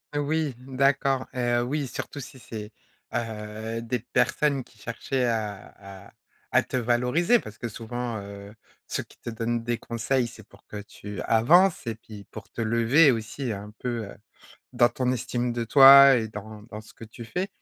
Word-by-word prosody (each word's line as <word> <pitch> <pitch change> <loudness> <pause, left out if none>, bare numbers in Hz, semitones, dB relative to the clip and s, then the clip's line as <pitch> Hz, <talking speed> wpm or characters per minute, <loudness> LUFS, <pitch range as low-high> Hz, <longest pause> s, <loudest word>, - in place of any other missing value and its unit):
Oui, 145 -1 0
d'accord, 135 0 +1
heu, 120 -1 +1
oui, 145 +4 -2
surtout 140 +3 -6
si 130 0 -11
c'est, 110 -3 -8 0.4
heu, 110 0 -4
des 120 +2 -2
personnes 130 +4 +1
qui 115 - -23
cherchaient 125 +3 -2
à 100 -3 -5
à - - -21 0.4
à - - +4
te - - -3
valoriser 125 - +2
parce 110 - -11
que 120 - -4
souvent, 120 +1 -5
heu, 100 0 -10 0.3
ceux - - -3
qui - - -22
te - - -6
donnent 115 0 -2
des 120 0 0
conseils, 120 +2 -1
c'est 110 -2 -13
pour - - -21
que 105 - -7
tu 105 0 -9
avances 165 +12 +4
et 115 - -2
puis 105 -2 -12
pour 110 - -10
te - - -6
lever, 115 +7 +4
aussi, 115 +2 -3
un 105 0 -7
peu, 120 -3 -3
heu, 100 - -11 0.6
dans 120 0 +4
ton 125 -1 -1
estime 120 0 -2
de 120 -1 -2
toi 135 +2 +9
et 110 -2 -1
dans 105 0 -9
dans 110 -1 -9
ce 110 - -16
que - - -11
tu 115 +2 -11
fais, 180 - -3
120 Hz, 180 wpm, -26 LUFS, 110-130 Hz, 0.6 s, toi